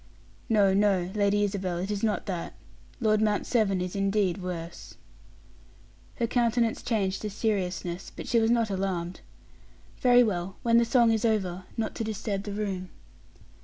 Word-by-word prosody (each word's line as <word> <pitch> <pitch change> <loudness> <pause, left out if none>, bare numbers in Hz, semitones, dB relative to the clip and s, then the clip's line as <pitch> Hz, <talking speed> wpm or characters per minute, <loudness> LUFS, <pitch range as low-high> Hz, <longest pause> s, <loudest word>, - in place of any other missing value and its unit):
"No, 205 -4 +4
no, 195 -3 +2
Lady 205 0 +2
Isabel, 190 -3 -2
it 190 +4 -3
is 205 -1 -2
not 215 -2 0
that. 180 -4 -4 0.4
Lord 215 -3 +2
Mount 210 -1 +1
Severn 200 -6 +1
is 180 +1 -4
indeed 195 -2 +1
worse." 170 -2 -6 1.2
Her 235 - 0
countenance 235 -1 +1
changed 200 -5 -1
to 215 - -3
seriousness; 190 -4 -2
but - - -7
she 235 - +3
was 225 0 +2
not 230 -3 +2
alarmed. 185 -2 -3 0.8
"Very 245 -1 +6
well. 190 -4 -2
When 235 0 +5
the 235 - +3
song 235 -1 +4
is 220 -1 0
over 190 -5 0
not 220 -1 -2
to - - -2
disturb 210 -2 -3
the 205 - -4
room." 195 -3 -3
205 Hz, 160 wpm, -27 LUFS, 185-225 Hz, 1.2 s, Very